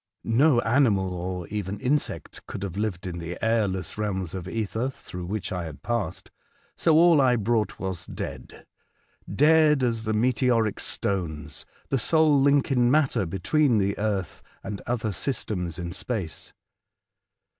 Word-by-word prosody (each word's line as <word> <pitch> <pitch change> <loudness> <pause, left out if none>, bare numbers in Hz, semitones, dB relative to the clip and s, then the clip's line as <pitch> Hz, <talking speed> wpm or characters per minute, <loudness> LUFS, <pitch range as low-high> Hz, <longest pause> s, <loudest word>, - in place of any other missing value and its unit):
No 125 +3 +4
animal 115 -7 +2
or 90 -1 -4
even 100 -1 -4
insect 140 +6 -2
could 95 - -6
have 95 -3 -4
lived 100 -4 -2
in 90 -2 -4
the 85 +1 -5
airless 105 -4 0
realms 95 -5 -2
of 95 -2 -5
ether 110 +4 -2
through 90 -9 -8
which 100 0 -3
I 90 -2 -3
had 75 -4 -9
passed, 120 -3 -3 0.4
so 165 -2 +3
all 165 -2 +6
I 125 -2 +4
brought 110 -1 0
was 95 -3 -4
dead 65 -2 -7 0.3
— - - -17 0.2
dead 155 -3 +5
as 115 -2 0
the 110 - 0
meteoric 120 -1 +2
stones, 80 -7 -2 0.2
the 135 - +1
sole 155 +2 +4
link 140 0 +3
in 120 -2 +3
matter 135 - +2
between 125 - +2
the 100 0 +1
earth 100 -4 -2 0.2
and 100 0 -5
other 115 -3 -1
systems 90 - -2
in 85 -1 -4
space. 95 -4 -4
105 Hz, 150 wpm, -26 LUFS, 95-125 Hz, 0.4 s, all